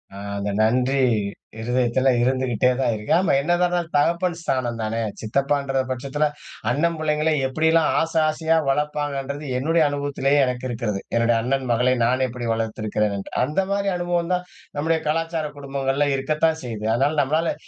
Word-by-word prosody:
அ. - - -8 0.2
அந்த 100 0 -2
நன்றி 125 +5 +2 0.6
இருதயத்துல 125 +2 +1
இருந்துகிட்டே 130 -1 +2
தான் 130 -3 +2
இருக்க, 105 0 -6
ஆமா 190 - +2
என்னதான் 175 +4 +1
இருந்தாலும் 175 -1 -2
தகப்பன் 170 +3 +1
ஸ்தானம்தானே, 115 -6 -2 0.2
சித்தப்பான்ற 140 +4 0
பட்சத்துல 140 +4 -1 0.4
அண்ணன் 165 +7 +1
புள்ளைங்களை 155 0 +1
எப்படியெல்லாம் 160 +3 +2
ஆசை 165 0 +1
ஆசையா 160 +1 +1
வளர்ப்பாங்கன்றது, 145 0 -2
என்னுடைய 160 +5 +2
அனுபவத்திலேயே 145 0 0
எனக்கு 125 0 -3
இருக்கிறது. 115 -4 -2 0.2
என்னுடைய 115 0 +3
அண்ணன் 135 +2 0
மகளை 125 +2 +3
நான் 130 +2 +2
எப்படி 120 -1 -5
வளர்த்திருக்கிறேன் 110 -2 -1
என்று. 100 - -7
அந்த 150 +8 -1
மாரி, 200 0 +1
அனுபவம் 175 0 -1
தான் 180 0 -1 0.3
நம்முடைய 160 +2 +1
கலாச்சார 165 +1 -1
குடும்பங்கள்ல 140 0 -1
இருக்கத்தான் 155 +4 +1
செய்யுது. 110 -4 -5
அதனால, 140 +5 +1
நம்மளால 155 +4 +1
140 Hz, 145 wpm, -23 LUFS, 125-160 Hz, 0.6 s, என்னுடைய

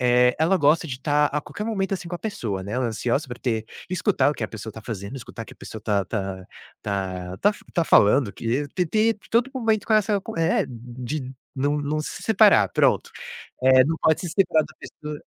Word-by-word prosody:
eh, 125 0 +4
ela 165 +5 +3
gosta 155 +1 +3
de 135 - -4
estar 145 +3 +2
a 150 +1 -2
qualquer 210 - -7
momento, 195 -3 -1
assim, 180 -2 -6
com 175 - -5
a - - -4
pessoa, 115 - -4
né. 100 +2 -6
Ela 125 +1 0
ansiosa 120 +5 -1
pra 120 - -7
ter, 115 -3 -1 0.3
escutar 185 -4 +2
o 150 - -3
que 115 - -3
a - - -4
pessoa 110 0 -7
está 110 - -10
fazendo, 105 +2 -6
escutar 115 -2 -8
o - - -11
que - - -12
a - - -33
pessoa 110 - -9
tá 105 -2 0
tá 95 -3 -4 0.9
tá 205 - +5
f - - -16
tá 170 - +2
falando 105 0 +5
que, 125 +5 -2
ter 180 -1 +1
ter 220 +6 +2 0.2
todo 240 +3 +2
momento 225 -5 0
com 220 - 0
essa 210 -1 +2
com - - -8
é, 165 +2 +2
de 125 +3 -6 0.2
não 145 +2 +1
não 145 +1 -1
se 150 - -6
separar, - - +5
pronto. - - +2 0.5
Eh, 130 0 +7
não 160 +3 0
pode 160 - +3
se 175 - -4
separar 175 -3 +3
da 155 - -16
pessoa 150 -1 -8
145 Hz, 225 wpm, -24 LUFS, 120-175 Hz, 0.9 s, Eh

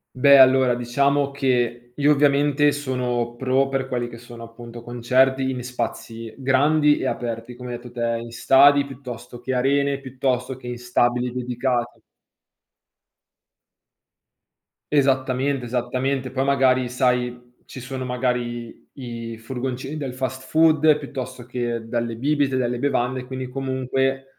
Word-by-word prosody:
Beh 140 +1 +7
allora, 130 -1 +6
diciamo 140 +4 +1
che 120 -3 -1
io 145 +1 +3
ovviamente 145 0 +3
sono 125 -4 -2
pro 130 +2 +1
per 135 -1 -2
quelli 120 -2 -2
che 115 -1 -10
sono 120 0 -11
appunto 115 0 -10
concerti 130 +3 +1
in 125 -1 -4
spazi 115 -2 -5
grandi 145 +3 +3
e - - -3
aperti 115 0 -4
come 125 0 -8
hai - - -3
etto 120 0 -10
te, 115 -1 -1
in 115 0 -8
stadi 140 +3 +5
piuttosto 125 -2 -9
che 130 +2 -3
arene, 140 +2 +1
piuttosto 130 -1 -2
che 130 - -15
in 120 -1 -5
stabili 125 0 +1
dedicati. 125 -1 -2 2.9
Esattamente, 135 -1 +1
esattamente, 130 +2 -2
poi 130 0 0
magari, 130 -2 +3
sai, 125 -1 -1
ci - - -10
sono, 130 +1 -5
magari, 125 -2 -3
i 115 -3 -7
furgoncini 130 +4 -5
del 135 -4 -5
fast 130 0 -3
food, 155 -1 +4
piuttosto 130 -4 -7
che 120 -2 -3
delle 115 0 -2
bibite, 140 +1 +1
delle 120 -1 -1
bevande, 130 -2 -1
quindi 130 0 -5
comunque 135 0 -1
130 Hz, 135 wpm, -23 LUFS, 120-135 Hz, 2.9 s, Beh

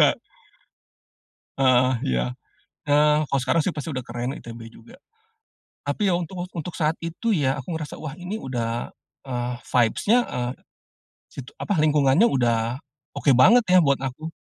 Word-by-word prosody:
enggak. - - +6 1.4
Heeh, 130 -1 +4 0.2
iya. - - +1 0.6
Nah, 150 +1 +4
kalau 140 - +1
sekarang 130 +6 +2
sih - - -1
pasti 150 +1 -5
udah 130 - -3
keren 120 +2 -4
ITB 115 0 -9
juga. 245 +3 -16 0.9
Tapi 190 +8 0
ya, - - +2
untuk 175 +1 -5
untuk 170 0 -6
saat 160 0 0
itu 170 +8 -3
ya, 145 -10 +2
aku 135 - -9
ngerasa, 160 -2 -5
"Wah 150 -3 -5
ini 180 +3 -5
udah, 120 -2 -3 0.3
eee, 125 -2 -3
vibes-nya, 125 - +2
e - - -5 0.9
sit 135 - -9 0.2
apa, 205 - -1
lingkungannya 150 +3 +4
udah, 120 - +1 0.3
oke 145 - +1
banget 225 - +7
ya," 185 0 +6
buat 140 -1 +2
aku. 135 +5 -5
140 Hz, 150 wpm, -24 LUFS, 125-165 Hz, 1.4 s, banget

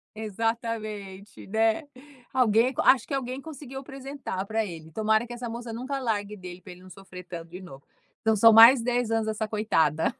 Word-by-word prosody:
Exatamente, 215 -2 -4
né, 220 +7 +1 0.5
alguém, 245 0 +3
acho 260 - +4
que - - -5
alguém 260 -1 -3
conseguiu 275 -3 -9
apresentar 270 -7 -6
para 220 +1 -1
ele. 160 -4 -9
Tomara 220 +5 +1
que 240 - -8
essa 240 0 -6
moça 235 0 -6
nunca 260 +4 -4
largue 210 -4 -2
dele 180 -2 -10
pra 185 - -11
ele 180 0 -13
não 185 - -14
sofrer 185 0 -11
tanto 170 -2 -9
de 180 +2 -9
novo. 140 -7 -12 0.4
Então 220 0 +2
são 225 +2 +7
mais 230 +3 +9
10 245 -1 -1
anos 225 -1 0
essa 220 0 -2
coitada. 165 -8 +1
220 Hz, 180 wpm, -26 LUFS, 195-245 Hz, 0.5 s, mais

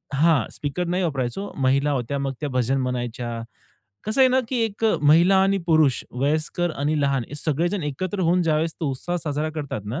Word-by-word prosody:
हां. 150 -4 +3
स्पीकर 145 +5 -3
नाही 180 +1 0
वापरायचो, 145 +6 -2
महिला 140 +2 +2
होत्या, 135 +1 -2
मग 135 -1 -2
त्या 145 - -2
भजन 130 +1 0
म्हणायच्या. 120 -2 -3 0.6
कसं 215 +5 0
आहे 260 - +7
ना, 255 - +3
की 260 - -2
एक 220 0 -4 0.2
महिला 170 +6 +5
आणि 195 0 +2
पुरुष, 155 -5 +3
वयस्कर 155 +6 -1
आणि 150 +2 0
लहान 140 -3 +1
हे 145 - -8
सगळेजण 170 +6 -1
एकत्र 175 +7 -3
होऊन 175 +1 +3
ज्यावेळेस 160 0 +1
तो 155 - 0
उत्साहात 175 +7 -3
साजरा 150 0 -2
करतात 145 -9 -5
ना 120 +9 -3
150 Hz, 185 wpm, -23 LUFS, 135-175 Hz, 0.6 s, आहे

